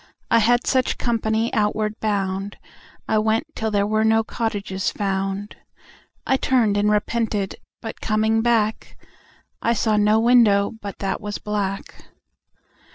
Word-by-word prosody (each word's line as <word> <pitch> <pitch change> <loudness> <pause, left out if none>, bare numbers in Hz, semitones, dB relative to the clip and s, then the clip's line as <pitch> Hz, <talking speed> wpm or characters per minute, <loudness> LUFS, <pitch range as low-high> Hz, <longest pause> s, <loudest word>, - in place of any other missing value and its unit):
I 230 - +6
had 240 +2 +3
such 260 -1 +1
company 225 -1 -1
outward 215 0 0
bound. 195 -1 -2 0.5
I 215 - +2
went 220 +5 +1
till 220 - -2
there 200 -1 +1
were 215 +1 +1
no 225 0 +3
cottages 205 -4 -2
found. 195 0 -3 0.7
I 265 - +2
turned 240 -6 +2
and 205 +1 +2
repented, 210 -1 -1 0.3
but 225 - -7
coming 220 +1 +1
back 225 -2 0 0.6
I 235 - +2
saw 215 -1 +1
no 210 +1 +4
window 225 -4 +4
but 200 -1 -7
that 195 -1 -2
was 205 -1 -4
black. 200 -2 -3
215 Hz, 135 wpm, -22 LUFS, 205-225 Hz, 0.7 s, I